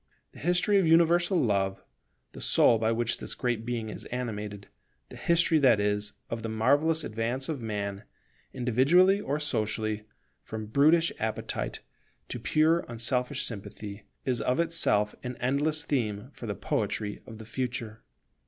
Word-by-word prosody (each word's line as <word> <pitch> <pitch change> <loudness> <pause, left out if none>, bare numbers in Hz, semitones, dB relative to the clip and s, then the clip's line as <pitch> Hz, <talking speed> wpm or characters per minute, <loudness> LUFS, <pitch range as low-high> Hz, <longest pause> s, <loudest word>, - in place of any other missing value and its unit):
The - - -14
history 180 +5 +3
of 180 - +2
universal 170 +2 +4
Love, 100 -6 0 0.5
the - - -10
soul 115 - +4
by 110 0 +1
which 115 +1 0
this - - -2
Great 120 -3 -1
Being 115 -3 -2
is - - -6
animated; 105 -5 -5 0.4
the - - -11
history, 170 -1 +3
that 130 -7 +5
is, 105 0 0
of 115 0 -4
the 110 - -4
marvellous 145 +9 +2
advance 115 +4 -2
of 150 -6 -3
man, 100 -2 -4 0.5
individually 140 - +4
or 145 -5 -2
socially, 110 -5 -2 0.4
from 110 -1 -6
brutish 155 +9 +4
appetite 110 0 -3 0.5
to 120 - -4
pure 155 +7 +3
unselfish 125 +3 0
sympathy, 100 -1 -7 0.2
is 125 -3 0
of 125 +6 0
itself 160 -11 +2
an 125 0 -5
endless 145 +5 +1
theme 120 -2 -2
for 120 - -8
the 105 - -3
poetry 105 0 -2
of 110 - -9
the 110 - -10
future. 115 -2 -4
120 Hz, 150 wpm, -28 LUFS, 110-150 Hz, 0.5 s, that